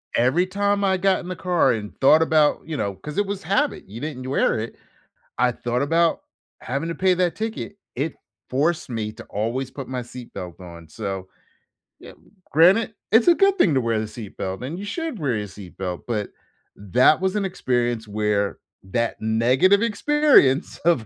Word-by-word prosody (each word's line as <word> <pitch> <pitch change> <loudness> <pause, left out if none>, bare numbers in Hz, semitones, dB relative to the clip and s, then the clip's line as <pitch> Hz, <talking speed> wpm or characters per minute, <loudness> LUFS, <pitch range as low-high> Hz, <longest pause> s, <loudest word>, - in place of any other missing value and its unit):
Every 130 +10 +3
time 200 +1 0
I 190 -1 +2
got 190 +1 +2
in 175 - -9
the 185 - -4
car 175 -8 +2
and 105 -3 -4
thought 155 +4 +6
about, 155 -2 +3
you 155 - -3
know 100 -5 -2
'cause 150 - -9
it 205 - +2
was 200 0 -5
habit, 280 +9 0
you 110 +4 -9
didn't 130 -3 -5
wear 130 -4 +1
it. 115 - -5 0.6
I 125 +1 +3
thought 120 +2 -2
about 165 +3 +2 0.4
having 140 +6 -3
to 170 - -3
pay 185 +1 +3
that 180 -1 +1
ticket. 220 -2 -4 0.2
It 145 +5 -2 0.3
forced 150 +2 0
me 110 -2 -3
to - - -11
always 120 +5 -3
put 135 -1 -8
my 130 -1 -3
seat 120 0 -11
belt 90 0 -8
on, 85 -2 -11
so, 95 +1 -5 0.7
yeah, - - -12 0.4
granted, 190 +9 +5 0.2
it's 225 +1 +5
a 345 - +7
good 395 +1 +3
thing 175 - +4
to 130 - +2
wear 115 -2 0
the 110 - -3
seat 110 -2 -10
belt, 95 +4 -4
and 145 +7 -5
you 200 - -6
should 310 - -4
wear 135 -6 0
your 105 - -4
seat 95 -2 -12
belt, 90 -2 -4
but 105 -4 -2 0.5
that 125 - +3
was 190 +1 0
an 205 -2 0
experience 120 - -1
where 105 -1 0 0.3
that 115 +5 -2
negative 125 - +3
experience 230 - +3
of 165 -10 +3
135 Hz, 190 wpm, -23 LUFS, 110-185 Hz, 0.7 s, a